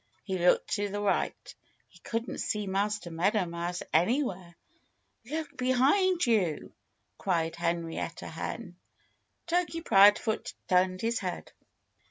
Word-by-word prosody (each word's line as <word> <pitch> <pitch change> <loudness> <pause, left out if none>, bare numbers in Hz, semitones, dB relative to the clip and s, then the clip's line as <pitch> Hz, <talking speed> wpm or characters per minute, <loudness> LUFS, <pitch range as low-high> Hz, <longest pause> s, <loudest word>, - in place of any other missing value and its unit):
He 190 +3 -3
looked 175 +1 +3
to 205 0 -1
the 205 +1 -3
right. 205 -1 -1 0.3
He - - -20
couldn't 230 +1 -4
see 210 -1 -1
Master 200 -1 -1
Meadow 185 +4 +1
Mouse 170 +1 -4
anywhere. 185 - +1 0.7
"Look 310 0 -4
behind 280 +9 +3
you!" 195 -10 0 0.5
cried 165 -3 0
Henrietta 170 -1 -3
Hen. - - -6 0.7
Turkey 340 -1 0
Proudfoot 210 - +4
turned 185 0 +2
his 230 0 0
head. 185 -2 -5
200 Hz, 115 wpm, -29 LUFS, 175-235 Hz, 0.7 s, Proudfoot